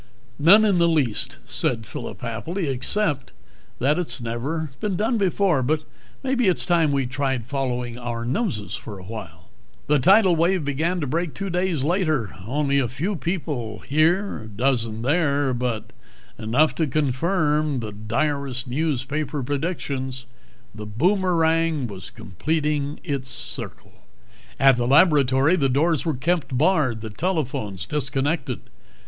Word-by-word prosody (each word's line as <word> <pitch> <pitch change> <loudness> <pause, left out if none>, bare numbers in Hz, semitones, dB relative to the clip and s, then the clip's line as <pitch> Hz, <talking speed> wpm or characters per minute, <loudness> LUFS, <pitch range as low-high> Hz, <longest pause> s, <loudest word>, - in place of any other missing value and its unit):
"None 200 +9 +7
in 195 -4 +3
the 170 - +4
least," 140 -10 +1
said 115 -3 -1
Phillip 100 -1 -7
happily, 155 - -3
"except 140 +3 -1 0.4
that 145 +7 +2
it's 140 -7 -2
never 130 +7 -3
been 210 -3 -1
done 220 +5 0
before. 190 -5 +2
But 155 +4 0 0.4
maybe 260 -4 +1
it's 185 - +4
time 170 -4 +3
we 135 -2 +1
tried 135 -2 -2
following 125 -3 -3
our 120 -1 -4
noses 130 - -2
for 105 -3 -6
a 95 - -11
while." 90 -5 -9 0.4
The 150 0 +3
tidal 190 - +5
wave 170 0 +2
began 160 +6 0
to - - -1
break 165 +4 -2
two 195 -1 -4
days 175 -5 0
later... 155 - 0
only 140 +2 +1
a 130 - +1
few 160 - -2
people 150 - -3
here, 165 +8 +2
a - - -9
dozen 115 0 -1
there, 145 -2 +2
but 120 -3 -3 0.4
enough 125 +8 +2
to 160 - +1
confirm 150 +1 +1
the 110 -3 -5
direst 130 +5 -2
newspaper 145 +1 -2
predictions. 135 -3 -3 0.5
The 105 0 -8
boomerang 165 - +2
was 95 -6 -8
completing 150 - -2
its 135 -3 -3
circle. - - -6 0.7
At 135 -2 +6
the 120 0 0
laboratory 140 0 +5
the 135 -5 +2
doors 155 +5 +1
were 160 -4 0
kept 155 -3 0
barred, 145 - +2
the 110 -1 -6
telephones 120 - -2
disconnected. 140 - -1
145 Hz, 140 wpm, -23 LUFS, 125-165 Hz, 0.7 s, None